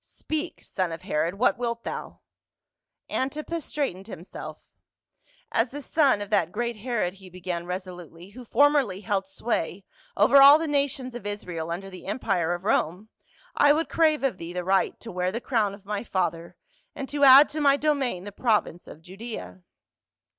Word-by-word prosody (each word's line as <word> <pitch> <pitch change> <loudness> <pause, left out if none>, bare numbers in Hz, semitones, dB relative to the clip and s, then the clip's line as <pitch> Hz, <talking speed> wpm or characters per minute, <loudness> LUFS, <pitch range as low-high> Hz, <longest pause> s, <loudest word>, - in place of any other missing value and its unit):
" - - -36 0.2
Speak, 315 +2 -4
son 185 -3 -2
of 165 - -7
Herod, 165 +4 -1
what 240 +3 +2
wilt 235 -1 -3
thou - - -6 0.4
?" - - -62
Antipas 305 +4 -4
straightened 200 -10 -3
himself, 180 -4 -9 0.9
"As 230 +2 +1
the 285 +3 -8
son 280 -10 +2
of 205 +1 -7
that 170 -5 +2
great 235 +2 -3
Herod," 215 -5 -2
he 190 -1 -14
began 180 -1 -5
resolutely, 180 -1 -7
"who 250 +4 -11
formerly 260 -5 +2
held 200 -3 -1
sway 195 -2 -3 0.3
over 280 0 +6
all 280 +2 +10
the 325 0 -3
nations 280 -3 -1
of 235 -4 -7
Israel 175 -6 -5
under 195 +3 -5
the 185 0 -11
em 200 - -2
pire 180 -9 0
of 175 - -9
Rome, 195 +1 0 0.5
I 290 0 +5
would 320 +2 -1
crav^e 310 -4 +3
of 195 -8 -7
thee 170 +1 -7
the 180 0 -3
right 190 +2 +1
to 230 - -8
wear 180 0 -1
the 230 - -3
crown 220 -6 0
of 200 -1 -20
my 205 +1 -3
father, 170 -5 -2 0.4
and 275 - -5
to 285 0 -1
add 275 +2 +9
to 305 +1 -4
my 280 -1 +5
domain 280 -11 0
the 205 - -7
province 210 -6 0
of 160 - -12
Judea." 185 - -8
205 Hz, 180 wpm, -26 LUFS, 180-270 Hz, 0.9 s, all